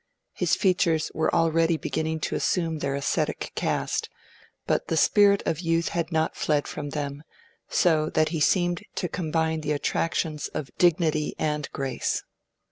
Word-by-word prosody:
His - - +1
features 170 -5 +2
were 160 - +1
already 165 0 +2
beginning 160 0 -2
to - - -2
assume 165 -3 0
their 140 -1 -1
ascetic 140 - -1
cast, - - -1 0.6
but - - 0
the 165 - 0
spirit 200 +4 +5
of 160 -2 -1
youth 165 -1 +1
had 170 0 -2
not 160 -1 +1
yet - - -19
fled 150 -2 +1
from 145 -1 -5
them, 145 -1 -4 0.5
so 155 -3 +3
that 155 0 +2
he 160 -1 -2
seemed 175 +2 +2
to 180 - -1
combine 160 -2 -1
the 150 0 -1
attractions 155 +1 -1
of 140 -5 -5
dignity 160 -3 +2
and 150 -2 -1
grace. 135 -2 -2
160 Hz, 155 wpm, -26 LUFS, 150-165 Hz, 0.6 s, spirit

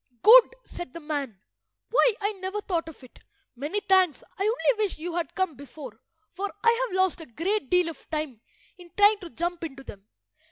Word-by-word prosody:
"Good," 485 +2 +8
said 350 -7 -8
the 335 - -7
man. 290 -8 -4 0.5
"Why, - - +4
I 410 +1 0
never 385 0 -5
thought 340 -5 -2
of 300 - -14
it! 255 - -16 0.4
Many 295 +11 -3
thanks. 375 -6 +3
I 390 - -9
only 445 0 +1
wish 405 - -2
you 335 +2 -5
had 340 -1 -3
come 375 -3 0
before, 260 -3 -11 0.3
for 395 +3 -4
I 470 +2 +3
have 375 - -6
lost 375 -3 +1
a 320 - -10
great 335 - -2
deal 360 -1 +3
of 330 - -9
time 300 -8 -4 0.4
in 350 -1 -13
trying 410 +1 +6
to 355 -4 -9
jump 345 +1 -3
into 275 -4 -7
them." 200 -5 -12
350 Hz, 195 wpm, -26 LUFS, 300-410 Hz, 0.5 s, Good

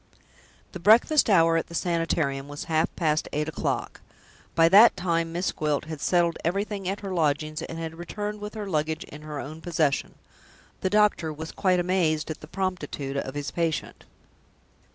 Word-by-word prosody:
The 185 - -7
breakfast 225 - +5
hour 165 -4 +5
at 165 - -2
the 170 - -9
Sanitarium 165 -6 0
was 145 0 -6
half 160 0 +1
past 155 -2 0
eight 150 +1 -1
o'clock. 160 - -3 0.5
By 165 0 +6
that 205 +6 +7
time 170 -2 0
Miss 175 +3 -1
Gwilt 150 -1 -1
had 155 -2 -7
settled 175 -2 +2
everything 195 +2 -2
at 200 +2 -3
her 195 -2 -4
lodgings, 155 -2 0
and 165 - -6
had 165 0 -6
returned 210 +4 -5
with 210 +1 -6
her 210 -2 -5
luggage 155 -2 -1
in 150 - -11
her 150 -1 -6
own 155 +4 -7
possession. 160 -5 0 0.6
The 190 - 0
doctor 210 -6 +2
was 160 +2 -7
quite 185 -2 +2
amazed 175 -4 +1
at 155 - -7
the 155 - -10
promptitude 160 -7 -3
of 135 0 -4
his 145 -1 -3
patient. 165 -2 -2
165 Hz, 175 wpm, -26 LUFS, 155-185 Hz, 0.6 s, that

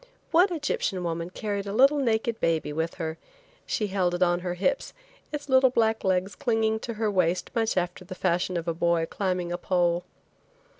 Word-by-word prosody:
One 360 +4 +5
Egyptian 285 - -1
woman 170 0 -3
carried 200 +1 -3
a 200 - -3
little 275 +6 +5
naked 230 -3 0
baby 160 -2 0
with 160 +2 -2
her. 160 -2 -4 0.5
She 215 - 0
held 185 -3 0
it 175 - +2
on 175 0 +2
her 180 0 -3
hips, 275 +10 -1 0.4
its 295 -1 -5
little 260 -1 +5
black 225 -2 +1
legs 190 +1 +1
clinging 220 -2 +1
to 230 0 -5
her 215 -1 0
waist 180 -2 +1
much 225 -4 0
after 180 +1 -1
the 185 +1 -8
fashion 180 0 0
of 170 0 -4
a 170 - +1
boy 170 0 +1
climbing 180 -1 -2
a 175 - -2
pole. 175 -1 +1
185 Hz, 190 wpm, -27 LUFS, 175-225 Hz, 0.5 s, One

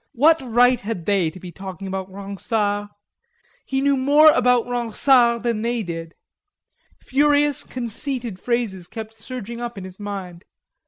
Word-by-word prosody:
What 315 +6 +4
right 245 0 +3
had 200 -5 -5
they 195 -5 +2
to 180 +4 -12
be 180 -1 -9
talking 190 +1 -8
about 190 0 -4
Ronsard? 205 +1 -2 0.8
He 270 0 0
knew 280 0 +3
more 290 +4 +6
about 250 -3 +3
Ronsard 240 0 +3
than 230 -3 0
they 235 0 -1
did. 165 -2 -6 0.8
Furious, 290 +1 +2
conceited 240 -3 -4
phrases 220 -7 -2
kept 220 +1 -8
surging 235 0 -7
up 240 -2 -5
in 195 - -6
his 185 +1 -11
mind. 195 -4 -6
230 Hz, 145 wpm, -22 LUFS, 195-250 Hz, 0.8 s, more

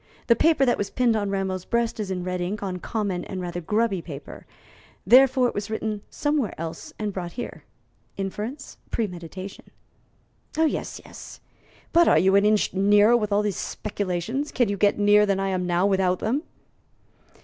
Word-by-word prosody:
The 235 - +5
paper 315 +2 +3
that 245 - +1
was 200 -1 -2
pinned 245 -3 +2
on 205 -2 -1
Rameau's 190 -2 -2
breast 235 0 -1
is 205 -3 -3
in 180 -1 -3
red 180 0 -3
ink 200 +4 -3
on 185 -2 -3
common 200 -2 -2
and 190 - -5
rather 175 -1 -4
grubby 210 +1 0
paper, 145 -4 -10 0.6
therefore 255 +4 +6
it - - -3
was 205 +1 -4
written 220 -1 -3
somewhere 290 -8 -1
else 165 0 -6
and 210 -2 -3
brought 175 -2 -5
here. 245 - -7 0.5
Inference, 210 +8 -5
premeditation." 185 -2 -5 0.9
"Yes, 320 -1 0
yes. - - -11 0.5
But 340 +1 +6
are - - +5
you 190 +2 +4
an 200 +1 +5
inch 210 0 +2
nearer 205 +4 +5
with 215 -3 0
all 205 +1 +2
these 205 -3 -1
speculations? 205 - -3
Can 245 -4 +1
you 200 - 0
get 200 +1 +2
nearer 205 0 +5
than 195 -1 +1
I 195 0 0
am 185 -1 -1
now 175 +1 +2
without 190 -2 +2
them?" 245 +10 -1
205 Hz, 175 wpm, -25 LUFS, 185-230 Hz, 0.9 s, therefore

